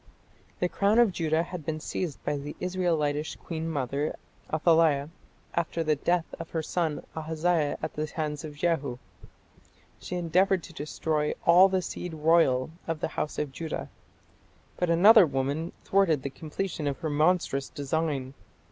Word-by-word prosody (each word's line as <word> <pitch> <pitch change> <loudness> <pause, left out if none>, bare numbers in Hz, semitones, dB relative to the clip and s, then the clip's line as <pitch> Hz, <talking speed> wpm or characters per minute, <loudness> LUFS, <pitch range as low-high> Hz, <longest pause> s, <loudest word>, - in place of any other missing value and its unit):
The 180 - +2
crown 200 +4 +2
of 235 -4 +5
Judah 160 -2 +1
had 180 -2 -7
been 155 +1 -3
seized 160 -1 -4
by - - 0
the 145 +1 -6
Israelitish 165 -5 0
Queen 165 -1 -5
mother 140 0 -2 0.4
Athaliah 155 -3 +3 0.4
after 170 0 -1
the 155 -1 +2
death 170 +3 +1
of 165 - -7
her 160 -1 -2
son 160 -2 -2
Ahaziah 160 -1 0
at - - -3
the 155 +1 -2
hands 150 -1 -4
of 150 -2 -7
Jehu. 145 -6 0 1.0
She 180 - -5
endeavoured 180 +1 +2
to - - -11
destroy 150 0 -1
"all 180 +3 +7
the 185 -1 0
seed 175 0 -5
royal 155 -4 +3 0.2
of 165 -2 -2
the - - -2
house 155 - -3
of 150 -2 -2
Judah". 160 +3 -5 0.9
But 180 - -1
another 190 +3 +7
woman 140 +4 -2
thwarted 170 -8 +2
the 140 - -3
completion 160 +1 -4
of 140 -2 -1
her 160 - -1
monstrous 150 -3 +1
design. 140 -2 -2
160 Hz, 155 wpm, -28 LUFS, 150-175 Hz, 1.0 s, all